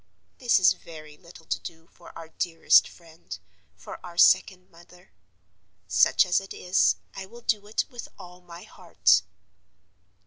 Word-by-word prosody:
This 245 -2 +2
is 185 -1 +4
very 155 -2 -13
little 170 0 -17
to - - -3
do 165 -2 -11
for 170 - -17
our 165 -1 -11
dearest 165 0 +2
friend, 160 - -13 0.4
for - - -12
our 175 -1 -11
second 185 0 +3
mother. 175 +2 -20 0.8
Such 90 - +3
as 180 +1 +1
it 195 - -11
is, 180 +1 +1 0.2
I 190 0 -8
will 235 +4 -15
do 210 -3 -2
it 215 - -2
with 240 -1 -9
all 180 -1 -14
my 175 0 -13
heart. - - +1
175 Hz, 150 wpm, -25 LUFS, 165-190 Hz, 0.8 s, is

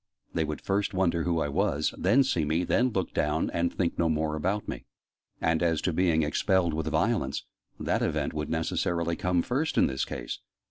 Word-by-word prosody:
They 80 - +1
would 75 0 -4
first 100 0 -1
wonder 85 -3 +2
who 85 -2 +1
I - - 0
was, 75 +1 0
then 135 +3 +4
see 110 -12 0
me, 80 +4 +1
then 125 +7 +2
look 95 -6 -2
down, - - 0
and 85 0 0
think 85 -3 -1
no 85 - +3
more 80 -1 0
about 95 +7 -1
me. - - -5 0.5
And 80 -1 +1
as 80 -2 +2
to 90 - 0
being 80 -2 +3
expelled 85 +3 +1
with 80 0 -2
violence, 100 - 0 0.3
that - - 0
event - - 0
would 75 0 -3
necessarily 85 +1 0
come 90 0 +1
first 150 +6 -1
in - - +6
this 65 0 -1
case. - - -5
85 Hz, 195 wpm, -28 LUFS, 80-95 Hz, 0.5 s, in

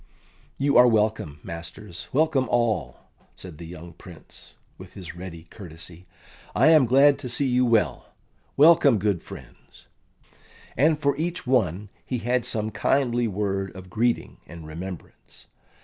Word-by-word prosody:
"You 140 +1 +2
are 125 0 +8
welcome, 105 -10 0
masters 85 +2 -9
welcome 140 -3 +1
all," 120 -2 0 0.3
said 90 -5 -11
the 85 - -8
young 85 0 -10
Prince, 85 -4 -13 0.2
with - - -13
his 90 -3 -9
ready 85 -2 -9
courtesy. 85 -1 -12 0.5
"I 130 +8 +5
am 155 -6 +6
glad 140 +3 +5
to 130 -3 -6
see 140 +4 +1
you 125 0 +2
well. 115 -3 +1 0.5
Welcome, 150 -4 +6
good 100 -3 -1
friends." - - -14 0.9
And 150 +4 +3
for 140 -2 +1
each 170 +3 -3
one 105 -6 0
he 125 - -3
had 120 +1 -1
some 110 0 -2
kindly 120 +2 +1
word 95 -2 -3
of 95 -1 -11
greeting 115 +4 -1
and 80 -1 -11
remembrance. 85 +4 -10
110 Hz, 140 wpm, -24 LUFS, 90-130 Hz, 0.9 s, are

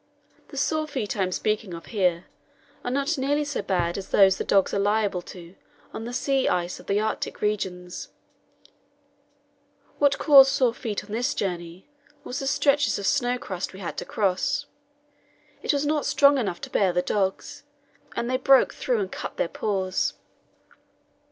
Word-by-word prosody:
The 275 - -11
sore 310 +2 0
feet 255 -8 -3
I 200 - -1
am 185 -1 0
speaking 210 -2 -1
of 165 - -10
here 180 -4 +1 0.6
are - - -2
not 280 +4 0
nearly 290 +3 +1
so 285 -5 -3
bad 175 -2 -1
as 195 - -9
those 195 -1 +5
the - - 0
dogs 195 -1 +2
are 200 - +1
liable 205 -2 +1
to 175 -1 -12 0.4
on 225 - -6
the 240 - -5
sea 270 +2 +1
ice 175 0 -1
of - - -15
the 200 +1 +2
Arctic 220 +1 -3
regions. 185 -4 -3 1.9
What 285 -1 +3
caused 275 -3 +7
sore 250 -4 +2
feet 220 -4 -4
on 210 - -14
this 235 +3 -1
journey 175 -2 -4 0.4
was 250 - -5
the 270 - -3
stretches 285 +1 +2
of 200 - -5
snow 250 -1 +1
crust 185 -6 -5
we 190 - -10
had 180 - -5
to - - -4
cross; 275 +9 0 1.0
it - - +1
was 285 0 0
not 300 0 0
strong 280 -1 +5
enough 195 -7 -3
to - - -7
bear 195 -3 +2
the 180 0 0
dogs, 195 -2 -2 0.5
and 235 - -2
they 255 +1 +1
broke 265 0 +4
through 245 -4 -1
and 190 - -4
cut - - -6
their - - +1
paws. 190 -2 -1
215 Hz, 175 wpm, -25 LUFS, 190-275 Hz, 1.9 s, caused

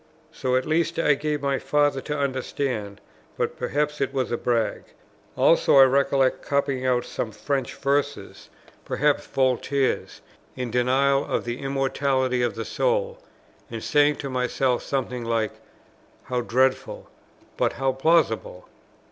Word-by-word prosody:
So 130 -1 -1
at 130 - +1
least 165 +1 0
I 160 -3 +4
gave 150 0 -2
my 140 -1 0
Father 145 -2 +1
to 150 +2 -4
understand; 130 -6 -3 0.4
but - - -1
perhaps 150 0 -2
it 135 - 0
was 130 -3 -2
a - - +1
brag. 115 -3 -1 0.5
Also, - - +4
I 135 - +10
recollect 135 0 +2
copying 140 -2 -1
out 125 -1 +1
some 110 - -4
French 135 +5 -3
verses, 140 -5 -2 0.3
perhaps 150 0 0
Voltaire's, 130 +1 0 0.3
in 125 -2 -4
denial 135 +3 +2
of - - -2
the 120 +1 -4
immortality 135 -2 0
of 120 -4 0
the 115 0 -4
soul, - - -1 0.5
and - - -6
saying 145 0 +3
to 140 - -6
myself 125 0 0
something 125 -3 -3
like 115 -2 0 0.7
"How 125 -1 -2
dreadful, 130 +2 0 0.5
but - - 0
how 135 0 0
plausible!" 135 - +1
135 Hz, 140 wpm, -24 LUFS, 125-145 Hz, 0.7 s, I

